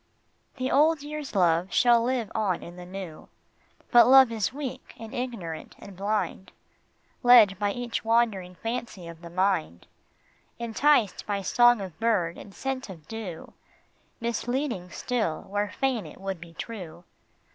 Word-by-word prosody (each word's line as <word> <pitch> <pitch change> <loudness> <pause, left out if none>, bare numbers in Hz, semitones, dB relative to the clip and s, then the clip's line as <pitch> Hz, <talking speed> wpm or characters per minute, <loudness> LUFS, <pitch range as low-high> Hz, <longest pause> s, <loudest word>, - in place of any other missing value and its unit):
The 255 -1 -2
old 300 +1 +3
year's 295 -4 -6
love 175 -1 +2
shall 240 +2 +5
live 240 -3 -1
on 200 -5 -1
in 175 - -10
the 180 0 -10
new. 185 -4 -8 0.6
But 240 -1 +8
love 265 -2 +8
is 220 -4 -1
weak 275 -1 -7
and 225 -1 -9
ignorant 230 -11 -5
and 200 -2 -12
blind, 200 0 -2 0.7
Led 230 -6 +7
by 205 -1 +1
each 245 +1 -4
wandering 220 -6 +1
fancy 225 -4 -5
of 165 0 -10
the 170 - -9
mind, 170 - 0 0.7
Enticed 235 0 +2
by 200 -1 -2
song 240 +2 +4
of 185 -5 -8
bird 200 -8 +1
and 200 - -11
scent 265 +2 -4
of 165 -5 -11
dew, 215 -7 -7 0.7
Misleading 235 -3 -2
still 220 -7 -2
where 205 +1 -2
fain 250 +1 -1
it - - -13
would 190 -3 -5
be 170 -1 -12
true. 180 -5 -8
215 Hz, 145 wpm, -27 LUFS, 180-245 Hz, 0.7 s, But